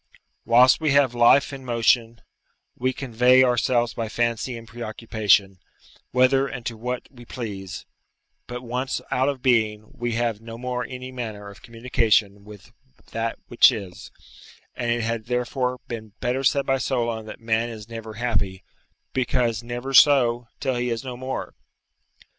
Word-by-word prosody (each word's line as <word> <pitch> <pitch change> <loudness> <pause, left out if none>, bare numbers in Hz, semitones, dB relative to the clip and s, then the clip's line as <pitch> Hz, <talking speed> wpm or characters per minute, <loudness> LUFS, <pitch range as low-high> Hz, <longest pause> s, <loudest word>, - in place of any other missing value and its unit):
Whilst 125 +5 +5
we 155 -3 +2
have 140 -3 +4
life 120 +4 +4
and 135 -1 -8
motion, 115 -1 +1 0.5
we 130 +1 0
convey 125 0 +4
ourselves 120 -1 +2
by 115 -2 -4
fancy 120 +2 -1
and 115 0 -11
preoccupation, 110 -4 0 0.5
whither 130 +2 +3
and 125 -4 -7
to 115 - -3
what 125 +3 -4
we 120 -3 -14
please; 100 -6 -7 0.6
but 125 +1 -6
once 125 +2 -2
out 130 +2 +2
of 135 -3 -5
being, 110 -4 +1
we 120 -1 -3
have 115 -2 -1
no 115 0 -9
more 125 0 -3
any 130 0 -7
manner 110 -5 -6
of 100 - -16
communication 115 -4 0
with 105 -2 -13 0.4
that 115 0 -2
which 120 +2 +6
is, 100 -7 -7 0.6
and 120 - -3
it 120 0 +1
had 115 -1 -2
therefore 125 +1 -1
been 110 -3 -7
better 125 +2 -1
said 140 +1 +2
by 135 0 +1
Solon 115 -3 -2
that - - -9
man 115 +1 0
is 110 -2 -9
never 115 -2 -8
happy, 100 -6 -2 0.5
because 120 -3 0
never 120 +3 -5
so, 125 -4 +5
till 130 -3 -1
he 125 0 -1
is 115 +2 -3
no 130 -2 -6
more. 130 +1 -5
120 Hz, 155 wpm, -24 LUFS, 115-125 Hz, 0.6 s, which